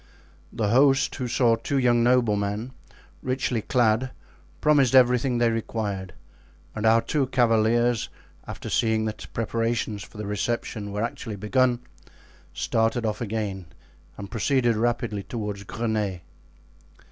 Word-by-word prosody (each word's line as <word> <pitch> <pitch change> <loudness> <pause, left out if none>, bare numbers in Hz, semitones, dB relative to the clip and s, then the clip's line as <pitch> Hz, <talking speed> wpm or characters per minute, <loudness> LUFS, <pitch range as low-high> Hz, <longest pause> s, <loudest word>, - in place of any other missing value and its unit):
The 105 -3 -1
host, 135 +3 +4
who 125 - -3
saw 120 -1 +3
two 140 +4 -2
young 120 -2 +3
noblemen, 110 -2 +1 0.5
richly 130 -2 -1
clad, 120 +1 +2 0.5
promised 140 -4 +3
everything 125 0 +4
they 120 -1 +3
required, 105 -4 -3 0.6
and 110 0 -1
our 115 +1 +5
two 140 -4 0
cavaliers, 120 -1 +2 0.4
after - - -7
seeing 110 -1 +1
that 110 -1 -5
preparations 115 -2 -2
for 110 - -12
the 105 - -5
reception 105 0 -3
were 105 +2 -2
actually 115 -1 -4
begun, 120 +4 +1 0.7
started 115 +1 0
off 105 0 -2
again 100 -5 -3 0.5
and 100 -1 -8
proceeded 120 0 +1
rapidly 115 -2 -1
toward 105 -1 -5
Greney. 105 -6 -2
115 Hz, 125 wpm, -25 LUFS, 105-125 Hz, 0.7 s, our